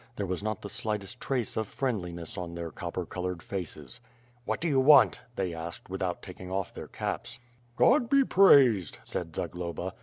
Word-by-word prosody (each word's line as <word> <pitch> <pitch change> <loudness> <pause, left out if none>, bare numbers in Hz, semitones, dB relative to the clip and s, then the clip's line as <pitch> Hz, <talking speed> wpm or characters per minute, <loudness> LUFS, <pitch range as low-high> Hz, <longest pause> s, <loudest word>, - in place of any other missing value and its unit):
There 100 - -2
was 90 0 -2
not 110 -1 -3
the - - -4
slightest 105 +1 -4
trace 125 -5 -1
of 110 -1 -1
friendliness 90 -11 -3
on 85 -1 -5
their 85 -1 -5
copper - - -4
colored 90 -2 -4
faces. 80 -8 -5 0.5
"What - - -1
do 170 - -1
you 140 -4 +3
want?'' 135 0 +7 0.2
they 95 -3 -1
asked, 85 +2 -7
without 95 -2 -2
taking 90 -1 -9
off 95 0 -2
their - - -7
caps. - - -4 0.4
"God 245 - +4
be 275 0 +5
praised," 130 - +6
said 80 -2 -5
Zagloba. 90 +2 -4
95 Hz, 175 wpm, -29 LUFS, 85-120 Hz, 0.5 s, want